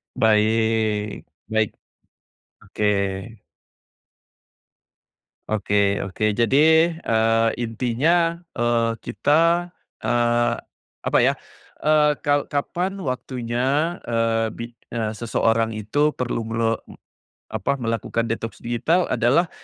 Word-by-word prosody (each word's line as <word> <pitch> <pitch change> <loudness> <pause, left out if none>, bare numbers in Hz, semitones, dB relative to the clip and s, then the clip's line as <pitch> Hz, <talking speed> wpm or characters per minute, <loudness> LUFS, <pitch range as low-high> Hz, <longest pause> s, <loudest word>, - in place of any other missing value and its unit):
Baik 110 -1 +1 0.3
baik, 110 -1 +2 0.9
oke. 105 +1 -4 2.7
Oke 100 -1 +1
oke 105 +3 -1
jadi, 115 +3 +1 0.5
eee, 115 0 +2
intinya, 135 +9 +1 0.2
eee, 115 -2 +1
kita, 165 +4 +2 0.3
eee, 120 0 +1 0.5
apa - - +2
ya, - - +4 0.5
eee, 150 -1 +4
kal 145 -1 +1
kapan 180 +6 -2
waktunya, 130 +5 -1
eee, 115 -1 +1
bi 115 - -5 0.2
eee, 110 -2 -2
seseorang 115 0 0
itu 145 +9 0
perlu 120 -2 -3
melo 115 0 0
m - - -12 0.6
apa 140 - -1
melakukan 115 0 -2
detox 115 0 -4
digital 125 +10 +1
adalah 140 +9 +3
115 Hz, 90 wpm, -22 LUFS, 110-140 Hz, 2.7 s, ya